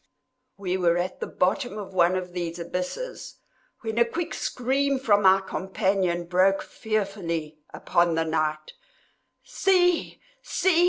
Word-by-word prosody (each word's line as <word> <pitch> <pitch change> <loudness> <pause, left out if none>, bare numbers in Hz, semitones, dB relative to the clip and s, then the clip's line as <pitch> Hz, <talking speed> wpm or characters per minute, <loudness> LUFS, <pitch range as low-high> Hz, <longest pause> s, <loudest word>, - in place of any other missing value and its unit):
We 185 -2 -2
were 175 -2 +2
at 180 +1 -3
the - - -3
bottom 215 +5 0
of 200 -2 -7
one 180 0 +4
of 180 -1 -4
these 170 -1 -3
abysses, 180 - -5 0.5
when 225 0 -2
a - - +7
quick 325 +9 -4
scream 270 +3 0
from 210 -6 +3
my 190 0 +6
companion 190 -2 -1
broke 185 +3 +3
fearfully 190 -8 -3
upon 175 -2 +1
the 165 0 +1
night. 155 -1 -1 0.7
"See! 360 -3 +2 0.2
see!" 370 -7 +2
190 Hz, 130 wpm, -26 LUFS, 175-230 Hz, 0.7 s, a